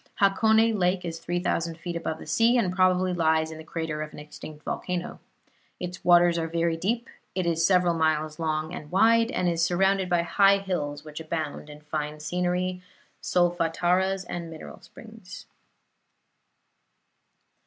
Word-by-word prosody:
Hakone 220 +3 +4
Lake 180 0 +1
is 165 -1 -5
three 175 +1 -2
thousand 170 -2 -1
feet 170 0 -6
above 165 -1 -3
the - - -11
sea, 230 +10 +3
and 185 -6 0
probably 185 0 +3
lies 160 -2 +1
in 160 - -9
the - - -9
crater 160 -2 -4
of 155 -1 -6
an - - -11
extinct 150 0 -10
volcano. 180 -1 -4 0.6
Its 180 0 -6
waters 175 -1 +5
are 165 - -2
very 165 0 0
deep; 225 +8 -2 0.3
it 185 -2 -1
is 165 -1 +1
several 180 -1 +4
miles 155 -1 0
long 155 0 -2
and 150 - -8
wide, 230 +4 +4
and 185 - -1
is 170 -1 +1
surrounded 190 +2 +2
by 175 -1 +2
high 200 +3 +4
hills 150 -7 -4
which 150 0 -8
abound 155 -2 -4
in 150 0 -11
fine 150 0 -4
scenery, 180 +3 -1 0.4
solfataras 175 +2 +1
and 170 -1 -5
mineral 160 -1 -10
springs. - - -12
175 Hz, 155 wpm, -26 LUFS, 160-185 Hz, 0.6 s, waters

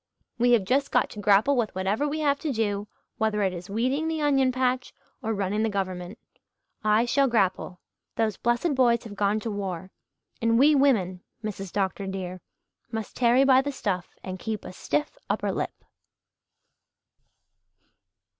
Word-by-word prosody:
We 245 +1 +4
have 225 -4 +4
just 270 +8 +1
got - - +2
to 210 - -8
grapple 205 +7 +4
with 230 -6 -1
whatever 195 +10 0
we 310 +2 -2
have 285 -2 +2
to 310 - -2
do 205 -3 -1 0.3
whether 215 -1 +1
it 190 -1 +1
is 175 +1 -8
weeding 255 +9 0
the 320 -1 -1
onion 275 -3 +3
patch, 255 0 -1 0.3
or 225 - -2
running 200 0 -1
the 225 - +1
Government. 185 0 -3 0.7
I 215 +2 +3
shall 275 +3 +3
grapple. 190 -5 0 0.4
Those 220 -3 0
blessed 240 +7 +1
boys 240 -3 +3
have 220 - -8
gone 205 +1 +1
to 225 - -3
war; 190 -3 -4 0.5
and 230 0 +3
we 290 +5 +6
women, 215 -11 +2 0.2
Mrs. 195 -3 -5
Dr. 195 0 -1
dear, 185 -1 -5 0.5
must 220 -2 -5
tarry 245 +2 +4
by 265 -1 +6
the 285 +1 -3
stuff 195 -9 -2
and 185 0 -6
keep 220 0 -4
a - - -7
stiff 300 - -2
upper - - 0
lip." - - -4
220 Hz, 165 wpm, -26 LUFS, 195-260 Hz, 0.7 s, we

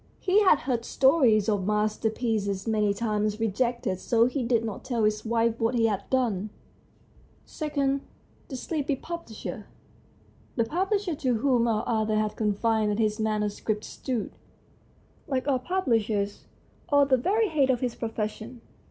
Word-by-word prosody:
He 390 +2 +3
had 370 -7 +5
heard 240 -2 -1
stories 255 -7 +3
of 205 -3 0
masterpieces 210 -1 0
many 210 -2 +2
times 210 0 -1
rejected, 225 -3 -1
so 230 +3 +3
he 255 +2 -1
did 230 -1 +1
not 215 -3 -5
tell 240 -4 -1
his 215 0 +1
wife 230 0 +1
what 230 +2 +1
he 230 -1 +3
had 205 -3 -1
done. 220 -6 0 1.1
II. 280 -2 0 0.5
THE 270 - -6
SLEEPY 290 +1 -2
PUBLISHER 260 -8 -7 0.9
The 230 - +2
publisher 380 - 0
to 260 -6 0
whom 240 -1 +2
our 220 -2 0
author 220 -2 +1
had 215 0 0
confided 215 0 +1
his 215 -1 0
manuscript 215 0 -1
stood, 250 -5 -4 1.0
like 260 -1 -1
all 265 -3 +2
publishers, 225 - -1 0.5
at 285 -1 +4
the 260 - +5
very 415 - +1
head 285 -5 +2
of 250 -2 +1
his 250 -2 -1
profession. 225 +1 -5
230 Hz, 145 wpm, -27 LUFS, 215-265 Hz, 1.1 s, had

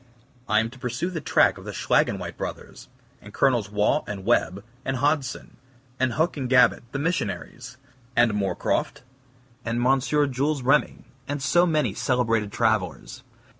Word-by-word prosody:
I 110 - +4
am 115 +1 -2
to 130 - -14
pursue 125 +9 -3
the 165 -3 -4
track - - +3
of - - -12
the - - -7
Schlaginweit - - 0
Brothers; - - -7 0.3
and - - -13
Colonels 120 -7 +2
Waugh 105 +8 +1
and 100 -2 -6
Webb, 95 +2 +1 0.2
and 135 -1 -2
Hodgson; 140 -1 -1 0.4
and 130 -2 +1
Huc 160 +4 0
and 130 -3 -3
Gabet, 125 -1 +5
the - - -3
missionaries; 125 - -3 0.4
and 120 -2 +4
Moorecroft 100 +2 -1 0.6
and 120 +1 -1
M. 135 +1 +4
Jules 145 0 0
Remy, 135 +2 +1 0.2
and 145 +1 -3
so 155 +7 +3
many 150 - +1
celebrated 115 -3 0
travelers. 100 - -1
125 Hz, 150 wpm, -24 LUFS, 110-140 Hz, 0.6 s, Gabet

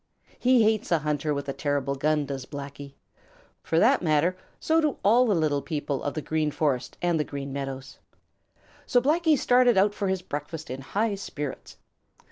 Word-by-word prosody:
He 250 -2 +4
hates 215 -2 +1
a 170 - +5
hunter 150 0 -1
with 140 -1 -3
a 140 - -2
terrible 140 -1 -1
gun, 150 +2 0
does 135 -2 -6
Blacky. 140 0 -8 0.7
For 165 - -1
that 240 +10 +4
matter, 165 +2 +2 0.2
so 320 +1 +2
do 305 -3 0
all 240 +5 +5
the 210 - +2
little 150 -3 +1
people 145 -3 -3
of 145 - -3
the 155 - -3
Green 155 -1 0
Forest 140 -4 -1
and 175 -2 +2
the - - +2
Green 140 -2 -6
Meadows. 135 -1 -6 0.9
So 245 - +4
Blacky 310 +4 +3
started 245 -3 +4
out 200 +2 +4
for 200 -1 -2
his 190 -1 -1
breakfast 150 0 -6
in 130 +1 -5
high 210 +10 -1
spirits. 150 -8 -6
155 Hz, 180 wpm, -26 LUFS, 140-210 Hz, 0.9 s, a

